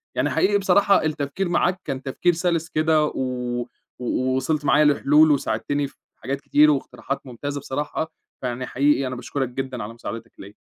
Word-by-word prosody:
يعني - - +1
حقيقي 205 +1 +3
بصراحة 200 -2 +4
التفكير 155 +4 -2
معاك 180 +1 +1
كان 130 - -3
تفكير 160 +6 +1
سَلِس 165 -1 -1
كده 155 0 +2
و 125 -3 -2 0.3
و 130 +1 0
وصلت 150 +3 -1
معايا 150 +1 +5
لحلول 150 +2 +5
وساعدتني 145 0 0
في - - -19 0.2
حاجات 135 +4 -4
كتير، 150 +1 +5
واقتراحات 135 0 -3
ممتازة 140 +3 -5
بصراحة، 150 +4 -3 0.3
فيعني 125 0 -3
حقيقي 140 0 +2
أنا 125 - -4
باشكُرك 125 +1 -3
جدًا 130 -2 -4
على 105 +2 -7
مساعدتك 115 0 -7
ليَّا. 100 +1 -10
140 Hz, 165 wpm, -23 LUFS, 130-155 Hz, 0.3 s, معايا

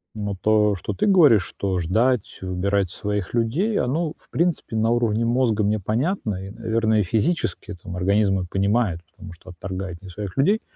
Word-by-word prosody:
Но 105 -2 -3
то, 105 -1 +3
что 95 - -5
ты 210 - 0
говоришь, 155 - +6
что 95 -2 -3
ждать, 110 +7 0
выбирать 95 +1 0
своих 105 0 -3
людей, 150 - +1
оно, 150 +5 -1
в - - -27
принципе, 170 -8 -1
на 110 +1 +2
уровне 115 -1 +1
мозга 115 -2 +1
мне 105 +1 +1
понятно. 110 - -2
И - - -8
наверное, 110 0 0
и - - +1
физически 115 - -1
это, 90 -4 -10
м, 90 - -5
организм 100 +2 +2
мой 90 -2 -2
понимает, 100 -2 +1
потому 90 +1 -11
что 85 +2 -13
отторгает 90 0 -6
не 95 - -11
своих 100 +1 -6
людей. 200 +11 +3
105 Hz, 185 wpm, -23 LUFS, 95-120 Hz, -, говоришь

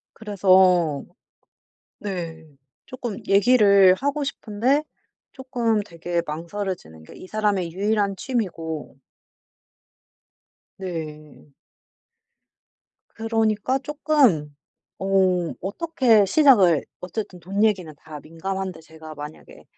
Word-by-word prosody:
그래서 185 -7 +3 0.9
네. 170 -5 -5 0.4
쪼끔 245 -5 -6
얘기를 200 -3 +6
하고 285 +7 -2
싶은데 265 +1 0 0.5
쪼끔 240 -5 -1
되게 170 -2 -3
망설여지는 170 - -5
게 - - -14
이 - - -11
사람의 200 -5 -1
유일한 200 +1 0
취미고 170 - -4 1.8
네. 155 -5 -7 1.6
그러니까 225 +2 0
쪼끔 270 - +1 0.4
어 190 -3 +1
어떻게 235 - +2
시작을 195 - +5 0.2
어쨌든 180 0 -6
돈 195 +5 0
얘기는 190 -7 0
다 150 +1 -10
민감한데 185 +2 -5
제가 160 -1 -12
만약에 150 +1 -11
195 Hz, 195 characters per minute, -23 LUFS, 165-220 Hz, 1.8 s, 얘기를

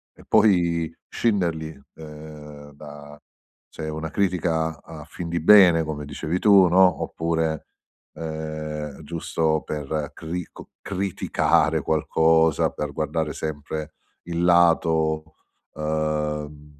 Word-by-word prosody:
e - - -17
poi 85 -5 +3 0.2
scinderli, 85 - -1 0.2
uhm, 75 -1 -11
da 75 0 -12 0.5
se - - -9
è 80 - -3
una 80 +1 -5
critica 80 -4 -1
a 80 -2 -11
fin 85 +3 -8
di 85 -1 -2
bene, 90 -3 +7
come 75 -2 -5
dicevi 80 +4 -3
tu, 100 -4 +6
no, 90 0 +4
oppure, 80 -2 -2 0.5
uhm, 75 -2 -6
giusto 80 0 -1
per 75 0 -4
crico 85 +2 -7
criticare 100 -1 0
qualcosa, 80 0 +2
per 75 -1 -5
guardare 75 +1 -2
sempre 75 0 -5 0.3
il 85 0 -3
lato, 80 -2 +2 0.4
uhm, 75 - -7
ehm, 75 -1 -3
80 Hz, 110 wpm, -23 LUFS, 75-85 Hz, 0.5 s, bene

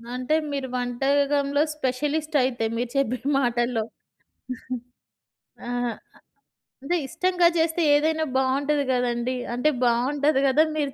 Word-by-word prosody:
అంటే, 255 +5 0 0.2
మీరు 275 -2 -3
వంటాగంలో 280 +3 +1
స్పెషలిస్టయితే, 280 -2 0
మీరు 240 0 -2
చెప్పిన 255 -1 -1
మాటల్లో. 240 -2 0 1.9
ఆహా! 245 -1 -1 0.9
అదే 345 +6 0
ఇష్టంగా 360 +4 +2
జేస్తే 325 +1 +1
ఏదైనా 315 +1 +1
బావుంటది 280 +2 +1
గదండీ. 245 0 -1 0.2
అంటే, 250 +5 +2 0.2
బాగుంటది 270 +4 +2
గద 265 +1 0 0.2
మీరు 285 -2 -1
275 Hz, 100 wpm, -24 LUFS, 245-295 Hz, 1.9 s, ఇష్టంగా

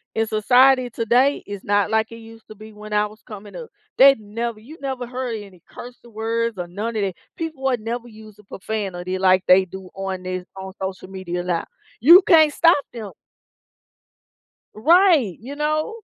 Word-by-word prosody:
in 225 0 0
society 250 +4 +4
today, 240 +5 +1
it's 205 -1 -7
not 205 0 +1
like 220 0 0
it 230 - -9
used 225 0 -15
to 215 - -12
be 215 +1 -13
when 210 0 -10
I 210 0 +2
was 215 +1 -12
coming 210 -2 -11
up, 475 -2 -8 0.3
they'd 275 -3 +7
never 220 +2 -5
You 280 +9 -13
never 265 -3 -4
heard 250 -1 -4
any 195 -4 -11
curse 245 0 -11
words 230 0 -3
or 175 -1 -5
none 215 +6 -5
of 210 - 0
that. 190 - -2 0.2
People 320 -5 -6
would 260 -2 +1
never 235 +2 -5
use 215 -2 -15
a - - -17
profanity 190 -3 -5
like 185 0 +3
they 185 +1 +6
do 190 0 -11
on 190 -1 -5
this 185 0 -5
on 190 0 -8
social 190 -1 -5
media 180 -2 -5
now. 175 -2 -1 0.4
You 340 +9 +9
can't 315 -6 +5
stop 335 +1 +5 0.2
them. 220 -5 -7 1.6
Right, 315 - +3
you 265 +6 -9
know? 305 +8 -1
220 Hz, 185 wpm, -21 LUFS, 195-250 Hz, 1.6 s, You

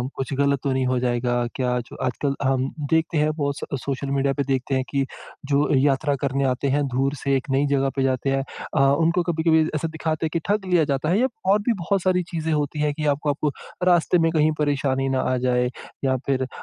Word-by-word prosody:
कुछ 135 +1 -3
ग़लत 140 0 +2
तो 140 - 0
नहीं 130 0 0
हो 130 0 +1
जाएगा? 120 0 0 0.2
क्या 125 -1 0
जो - - -10
आजकल 135 +3 -1
हम 135 0 +1 0.2
देखते 160 0 +2
हैं 150 +1 +2
बहुत 140 -2 -1
स 140 - -4
सोशल 140 +1 -3
मीडिया 140 0 +1
पे 140 - -1
देखते 135 0 -1
हैं 130 - +1
कि 140 -1 +1 0.5
जो 140 +1 +3
यात्रा 140 +1 +2
करने 140 0 0
आते 130 +2 -3
हैं, 145 0 +1
दूर 135 +2 0
से 140 -1 +2
एक 130 - -7
नई 135 +2 +2
जगह 135 0 +2
पे 135 - +1
जाते 130 0 0
हैं 135 0 +1 0.3
अ, - - +4 0.2
उनको 170 +2 +2
कभी-कभी 160 -1 +2
ऐसा 155 +2 -1
दिखाते 160 0 -2
हैं - - -1
कि 170 - +1
ठग 205 0 +1
लिया 175 -3 +5
जाता 135 +3 -1
है 190 +5 +3
या 260 - +3 0.2
और 205 - +4
भी 240 - +4
बहुत 195 +3 0
सारी 180 -1 +2
चीज़ें 160 -2 -2
होती 150 0 -1
हैं 150 -1 +1
कि 150 +1 -4
आपको 150 +1 -3
आपको 145 +1 0 0.4
रास्ते 175 0 +4
में - - +1
कहीं 155 -1 +3
परेशानी 135 -2 0
ना 130 -1 +1
आ - - +2
जाए। 125 0 +2 0.4
या 130 -1 +2
फिर 130 -1 0
140 Hz, 230 wpm, -23 LUFS, 135-160 Hz, 0.5 s, लिया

